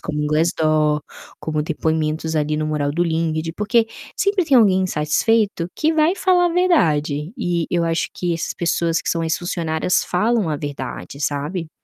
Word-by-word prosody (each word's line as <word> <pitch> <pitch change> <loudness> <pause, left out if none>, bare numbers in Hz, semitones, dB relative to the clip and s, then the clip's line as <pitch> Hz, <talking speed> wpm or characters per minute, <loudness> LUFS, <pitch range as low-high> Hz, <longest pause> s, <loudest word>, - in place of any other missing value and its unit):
como 150 -1 -3
o 150 - 0
Glassdoor, 155 -1 +2 0.4
como 155 -1 -2
depoimentos 160 0 -1
ali 150 0 0
no 155 0 -1
mural 150 -2 -1
do 170 - +1
LinkedIn 165 -1 -1
porque 225 +2 +2 0.3
sempre 400 -3 +1
tem 280 -4 +4
alguém 195 -5 +5
insatisfeito 185 +4 +1
que 315 +1 +2
vai 320 +3 +3
falar 365 -2 +3
a - - +2
verdade 160 - +1
e 175 -7 -1
eu 175 -1 +1
acho 165 0 0
que 175 -1 -1
essas 165 - -3
pessoas 170 0 0
que - - -5
são 165 -1 -1
ex-funcionárias 165 0 -1
falam 215 +1 +1
a 150 - -1
verdade, 145 -1 -6
sabe. 150 +4 -2
165 Hz, 165 wpm, -20 LUFS, 155-200 Hz, 0.4 s, alguém